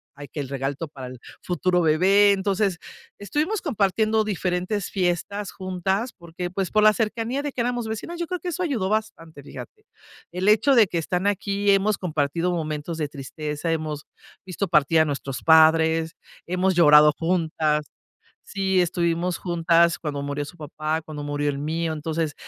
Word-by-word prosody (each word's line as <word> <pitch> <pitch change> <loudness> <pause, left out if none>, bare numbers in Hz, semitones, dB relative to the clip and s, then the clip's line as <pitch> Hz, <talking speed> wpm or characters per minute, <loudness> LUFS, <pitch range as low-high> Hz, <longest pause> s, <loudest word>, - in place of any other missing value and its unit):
ay, 145 0 -9
que - - -7
el 140 - -3
regalo 135 0 -2 0.2
para 130 -2 -8
el 125 -1 -10 0.2
futuro 180 0 0
bebé. 190 +6 +4
Entonces 195 -1 0 0.4
estuvimos 300 - -1
compartiendo 220 - +1
diferentes 190 0 -2
fiestas 195 +2 -2
juntas 190 +5 -2
porque, 170 0 -6
pues, 190 0 -2
por 215 0 +3
la 215 0 +7
cercanía 230 +4 -2
de 290 0 -4
que 255 - -3
éramos 240 -1 -2
vecinas, 280 +11 -5
yo 340 - -2
creo 360 +1 -3
que 355 - -4
eso 350 +1 -4
ayudó 240 - -1
bastante, 210 -8 -3
fíjate. 430 - -11 0.5
El 180 +2 -2
hecho 245 +6 +4
de 230 -3 +7
que 170 - -2
están 180 +3 -2
aquí, 200 0 +1
hemos 200 +1 +2
compartido 165 +1 -1
momentos 155 -1 -3
de 150 - -1
tristeza, 150 +3 -5
hemos 155 -2 -3 0.4
visto 190 +2 -3
partir 160 -1 +3
a 160 - +5
nuestros 140 -3 -4
padres, 160 0 +4 0.3
hemos 185 +1 +1
llorado 150 -2 +7
juntas. 160 -3 0 0.6
Sí, 190 -2 0
estuvimos 170 0 0
juntas 170 -1 +2
cuando 145 -3 -4
murió 145 +1 -3
su 175 - -12
papá, 155 +1 -3
cuando 150 -2 -7
murió 145 0 -2
el 140 - -3
mío. 160 +2 -2
Entonces 155 0 -2
175 Hz, 165 wpm, -24 LUFS, 155-205 Hz, 0.6 s, la